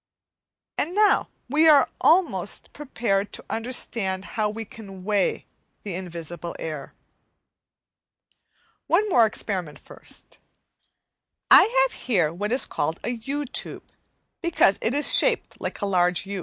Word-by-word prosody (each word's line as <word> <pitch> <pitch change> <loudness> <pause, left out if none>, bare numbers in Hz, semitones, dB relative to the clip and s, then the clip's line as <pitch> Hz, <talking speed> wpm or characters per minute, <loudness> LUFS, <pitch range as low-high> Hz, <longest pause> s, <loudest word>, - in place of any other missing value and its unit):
And 345 +5 -1
now 420 0 +3 0.2
we 305 +5 +4
are 290 -2 +6
almost 355 +2 +1
prepared 220 -8 -2
to - - -7
understand 225 -5 -2
how 215 -1 0
we 225 +2 -6
can 195 -3 -12
weigh 205 -1 0 0.4
the 200 - -5
invisible 170 -1 -6
air. 155 -3 -7 1.9
One 410 +5 +3
more 235 - +5
experiment 185 -7 -4
first. - - -12 1.1
I - - +10 0.2
have - - -5
here 175 -10 +1
what 205 +5 -3
is 255 - +2
called 160 +3 -3
a 240 - -2
U 275 +5 -4
tube, 260 - -6 0.5
because 340 - +3
it 225 +4 0
is 290 - +3
shaped 485 -2 +1
like - - -4
a - - 0
large 180 -1 +1
U. 200 0 -5
210 Hz, 130 wpm, -24 LUFS, 185-275 Hz, 1.9 s, I